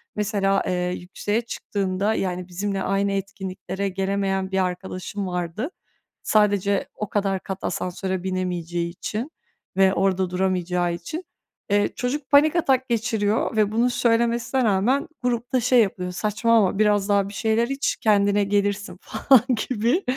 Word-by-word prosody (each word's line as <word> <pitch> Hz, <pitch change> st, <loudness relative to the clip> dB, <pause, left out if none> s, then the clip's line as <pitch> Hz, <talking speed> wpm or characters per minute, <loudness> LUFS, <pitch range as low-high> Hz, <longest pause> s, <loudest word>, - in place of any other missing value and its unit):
Mesela, 200 Hz, -2 st, +1 dB
eee, -, -, 0 dB, 0.3 s
yükseğe 205 Hz, +5 st, -2 dB
çıktığımda, 200 Hz, -2 st, -2 dB
yani, 180 Hz, -3 st, -2 dB
bizimle 195 Hz, +2 st, -3 dB
aynı 195 Hz, +1 st, +1 dB
etkinliklere 195 Hz, 0 st, -4 dB
gelemeyen 195 Hz, 0 st, -1 dB
bir 190 Hz, -1 st, +2 dB
arkadaşım 185 Hz, +2 st, -5 dB
vardı. 180 Hz, -, -3 dB, 0.5 s
Sadece 205 Hz, -2 st, +2 dB
o 210 Hz, -, -4 dB
kadar 195 Hz, -2 st, 0 dB
kat 190 Hz, 0 st, -6 dB
asansöre 185 Hz, 0 st, -3 dB
binemeyeceği 175 Hz, -2 st, -2 dB
için 215 Hz, -, -5 dB, 0.5 s
ve 190 Hz, -1 st, +5 dB
orada 190 Hz, -1 st, +1 dB
duramayacağı 180 Hz, -1 st, 0 dB
için. 310 Hz, -, -6 dB, 0.4 s
Eee, 205 Hz, 0 st, +3 dB
çocuk 265 Hz, +2 st, -3 dB
panik 295 Hz, +3 st, +5 dB
atak 265 Hz, -6 st, +2 dB
geçiriyor 220 Hz, -1 st, 0 dB
ve 210 Hz, -1 st, +3 dB
bunu 235 Hz, +3 st, +2 dB
söylemesine 235 Hz, +2 st, +1 dB
rağmen 235 Hz, -, +2 dB, 0.2 s
grupta 245 Hz, +1 st, 0 dB
şey 245 Hz, 0 st, +4 dB
yapıyor, 180 Hz, -3 st, -1 dB
saçmalama 210 Hz, +1 st, +2 dB
biraz 210 Hz, -1 st, +3 dB
daha 200 Hz, -1 st, +2 dB
bir -, -, -10 dB
şeyler 225 Hz, +2 st, +1 dB
iç, 275 Hz, +1 st, 0 dB
kendine 205 Hz, -1 st, +3 dB
gelirsin 200 Hz, -2 st, -1 dB
falan 265 Hz, -5 st, +4 dB, 0.3 s
gibi. 250 Hz, -, +1 dB
200 Hz, 135 wpm, -23 LUFS, 190-225 Hz, 0.5 s, ve